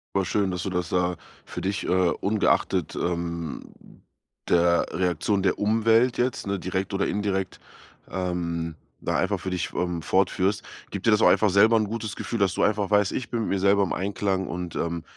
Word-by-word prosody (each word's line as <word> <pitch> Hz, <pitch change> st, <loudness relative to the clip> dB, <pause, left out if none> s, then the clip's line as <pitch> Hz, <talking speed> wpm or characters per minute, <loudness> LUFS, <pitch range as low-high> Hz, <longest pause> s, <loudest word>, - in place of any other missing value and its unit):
Aber 95 Hz, -, +2 dB
schön, 95 Hz, +2 st, 0 dB
dass 90 Hz, -2 st, -3 dB
du -, -, -2 dB
das 90 Hz, -2 st, -2 dB
da 90 Hz, -1 st, 0 dB, 0.3 s
für -, -, -7 dB
dich, 100 Hz, +1 st, -2 dB
äh, -, -, -4 dB
ungeachtet, 95 Hz, +3 st, +1 dB
ähm 85 Hz, -2 st, -3 dB, 0.7 s
der 85 Hz, 0 st, +3 dB
Reaktion 90 Hz, +3 st, 0 dB
der 95 Hz, -1 st, +1 dB
Umwelt 115 Hz, +3 st, +3 dB
jetzt, 125 Hz, +1 st, 0 dB
ne, 100 Hz, -1 st, -2 dB
direkt 95 Hz, +2 st, -3 dB
oder 100 Hz, 0 st, 0 dB
indirekt, 100 Hz, -2 st, -2 dB, 0.5 s
ähm, 85 Hz, -3 st, -3 dB, 0.3 s
da -, -, 0 dB
einfach -, -, 0 dB
für 95 Hz, -, -4 dB
dich, 90 Hz, -2 st, -2 dB
ähm, 90 Hz, -1 st, -2 dB
fortführst. 95 Hz, +1 st, +1 dB, 0.3 s
Gibt 100 Hz, +1 st, -4 dB
dir 115 Hz, -, +6 dB
das 105 Hz, -, +4 dB
auch -, -, +7 dB
einfach 105 Hz, -, +4 dB
selber 110 Hz, +4 st, +5 dB
'n 110 Hz, -, +1 dB
gutes 110 Hz, -1 st, -4 dB
Gefühl, 115 Hz, -, -4 dB
dass 95 Hz, -2 st, +2 dB
du -, -, -2 dB
einfach 105 Hz, -1 st, +1 dB
weißt: 105 Hz, -2 st, +3 dB
„Ich 125 Hz, -, -4 dB
bin 120 Hz, -2 st, -1 dB
mit -, -, -2 dB
mir 100 Hz, -, 0 dB
selber 100 Hz, +1 st, +4 dB
im 95 Hz, -, -2 dB
Einklang 95 Hz, -1 st, -1 dB
und, 90 Hz, -1 st, -5 dB
ähm, 85 Hz, 0 st, -2 dB
95 Hz, 195 wpm, -25 LUFS, 90-105 Hz, 0.7 s, auch